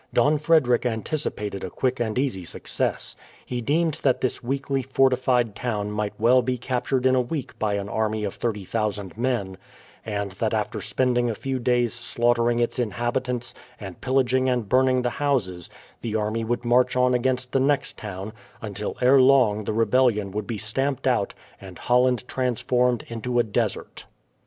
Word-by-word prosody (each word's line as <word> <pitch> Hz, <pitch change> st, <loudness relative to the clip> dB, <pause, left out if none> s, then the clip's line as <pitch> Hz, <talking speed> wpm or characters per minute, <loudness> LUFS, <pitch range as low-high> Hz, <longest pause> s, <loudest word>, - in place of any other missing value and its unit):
Don 150 Hz, +1 st, +4 dB
Frederick 150 Hz, -6 st, +3 dB
anticipated 110 Hz, -4 st, -3 dB
a 95 Hz, -, -4 dB
quick 130 Hz, +6 st, -1 dB
and 115 Hz, -1 st, -1 dB
easy 125 Hz, -9 st, -1 dB
success. -, -, -3 dB, 0.3 s
He 125 Hz, -1 st, -3 dB
deemed 155 Hz, +4 st, 0 dB
that 130 Hz, -2 st, +2 dB
this 130 Hz, -, -2 dB
weakly 135 Hz, +2 st, -1 dB
fortified 130 Hz, -3 st, +2 dB
town 105 Hz, -4 st, -2 dB
might 105 Hz, 0 st, -3 dB
well 125 Hz, +3 st, +5 dB
be 125 Hz, +1 st, -1 dB
captured 125 Hz, +1 st, -1 dB
in 130 Hz, -, +5 dB
a 130 Hz, -, +4 dB
week 130 Hz, +1 st, -5 dB
by 105 Hz, -2 st, 0 dB
an 100 Hz, 0 st, -3 dB
army 110 Hz, 0 st, -1 dB
of 100 Hz, -, -2 dB
30,000 105 Hz, -3 st, -3 dB
men, 115 Hz, -6 st, -2 dB, 0.4 s
and 100 Hz, -2 st, -3 dB
that 95 Hz, -, -1 dB
after -, -, -2 dB
spending 120 Hz, -2 st, +1 dB
a 115 Hz, -, -2 dB
few 135 Hz, +3 st, -3 dB
days 120 Hz, -1 st, +1 dB
slaughtering 120 Hz, 0 st, +1 dB
its 120 Hz, +2 st, 0 dB
inhabitants, 120 Hz, +1 st, -2 dB, 0.3 s
and 95 Hz, -4 st, -9 dB
pillaging 130 Hz, 0 st, +2 dB
and 120 Hz, -4 st, 0 dB
burning 130 Hz, +2 st, +3 dB
the 120 Hz, -, 0 dB
houses, 100 Hz, -, 0 dB, 0.3 s
the 110 Hz, -2 st, -3 dB
army 110 Hz, +1 st, -1 dB
would 120 Hz, +2 st, -2 dB
march 125 Hz, +1 st, +3 dB
on 125 Hz, 0 st, +3 dB
against 125 Hz, +1 st, 0 dB
the 135 Hz, -, +2 dB
next 140 Hz, +1 st, +1 dB
town, 105 Hz, 0 st, -7 dB, 0.3 s
until 105 Hz, -2 st, -5 dB
ere 130 Hz, +2 st, +6 dB
long 125 Hz, -6 st, +4 dB
the -, -, -1 dB
rebellion 115 Hz, -3 st, +2 dB
would 105 Hz, +1 st, -4 dB
be 115 Hz, -, -3 dB
stamped 135 Hz, +6 st, -2 dB
out, 120 Hz, -6 st, +1 dB, 0.3 s
and -, -, -10 dB
Holland 125 Hz, 0 st, +2 dB
transformed 125 Hz, -1 st, 0 dB
into 120 Hz, +2 st, -3 dB
a 120 Hz, -, +5 dB
desert. 105 Hz, -, -3 dB
120 Hz, 165 wpm, -24 LUFS, 110-130 Hz, 0.4 s, ere